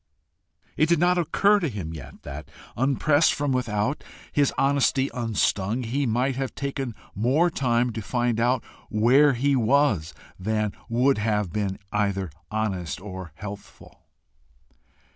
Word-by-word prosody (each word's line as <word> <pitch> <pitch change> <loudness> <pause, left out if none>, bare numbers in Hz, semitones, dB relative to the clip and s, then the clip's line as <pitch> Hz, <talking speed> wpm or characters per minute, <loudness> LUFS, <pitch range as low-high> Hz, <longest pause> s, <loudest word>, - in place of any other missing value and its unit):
It 155 - +3
did 170 - +4
not 180 +2 +3
occur 200 +5 +3
to 170 -5 -1
him 95 -8 -5
yet 70 -4 -10
that, 70 +1 -8 0.3
unpressed 145 +4 +3
from 145 -1 -1
without, 120 +1 -1 0.3
his 145 -2 +2
honesty 135 -1 +2
unstung, 115 -1 0
he 130 +4 -1
might 125 +4 +1
have 135 -1 -3
taken 135 -4 -3 0.2
more 135 - +2
time 120 -4 +1
to 110 - -4
find 120 +2 0
out 120 +1 +2 0.3
where 130 +7 +5
he 140 +3 +1
was 120 - +2 0.2
than 105 +2 0 0.2
would 125 +2 +2
have 105 -4 0
been 100 -2 -1
either 100 -4 -1 0.2
honest 100 -6 -2
or 95 -4 -8
healthful. 100 +2 -11
120 Hz, 135 wpm, -25 LUFS, 105-140 Hz, 0.3 s, where